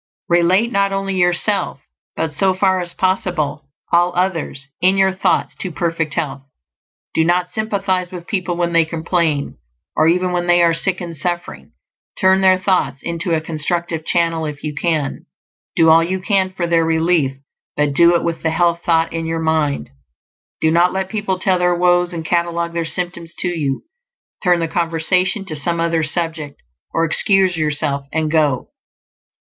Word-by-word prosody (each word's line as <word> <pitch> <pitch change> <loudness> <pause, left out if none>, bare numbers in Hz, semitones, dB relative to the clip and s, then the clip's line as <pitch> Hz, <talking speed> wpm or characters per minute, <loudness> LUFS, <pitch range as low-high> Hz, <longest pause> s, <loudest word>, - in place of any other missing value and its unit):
Relate 180 +7 +3
not 200 -2 +1
only 195 0 -2
yourself, 175 -2 0 0.4
but 160 -1 -2
so 190 +4 +2
far 185 -1 +2
as 175 -1 -5
possible 175 -7 -1 0.2
all 175 +1 +4
others, 175 -6 -1 0.2
in 190 +2 +3
your 190 0 +4
thoughts, 190 - 0
to 185 - -4
perfect 165 -2 -2
health. 140 -2 -2 0.7
Do 160 - +3
not 175 +2 +1
sympathize 195 -4 -1
with 180 -2 -8
people 180 -3 -2
when 170 -1 0
they 165 -1 +5
complain, 160 -2 -1 0.4
or 155 - +3
even 180 +2 +2
when 175 0 -1
they 175 0 +5
are 170 -1 +4
sick 185 +3 -1
and 170 -2 -6
suffering. 155 - -4 0.5
Turn 190 0 +4
their 185 -1 +5
thoughts 180 -8 0
into 170 0 -1
a 155 - -1
constructive 165 +1 -2
channel 165 -1 0
if 145 -1 -7
you 150 -1 -3
can; 155 -2 -2 0.5
do 165 -1 +5
all 165 +1 +6
you 185 +3 -2
can 190 -1 +1
for 185 -2 -3
their 170 -1 +2
relief, 160 -4 +1 0.4
but 150 -1 +1
do 170 +3 +5
it - - +1
with 170 -1 -2
the 160 - 0
health 170 +1 +1
thought 165 -1 +1
in 165 0 -3
your 165 0 -2
mind. 155 - 0 0.7
Do 160 - +3
not 175 +2 +4
let 190 0 -2
people 205 -3 -2
tell 185 0 +1
their 180 0 +2
woes 175 0 +2
and 165 -2 -5
catalogue 170 0 -1
their 170 -1 -1
symptoms 170 -1 -5
to 180 - -1
you; 145 -6 -2 0.6
turn 175 -3 +3
the 165 - 0
conversation 175 +4 0
to 155 - -5
some 170 +4 -2
other 165 -1 +1
subject, 160 -2 -3 0.3
or 165 - +1
excuse 190 +2 +2
yourself 145 -3 -1
and 155 -1 -1
go. 150 -5 +1
170 Hz, 175 wpm, -18 LUFS, 160-180 Hz, 0.7 s, all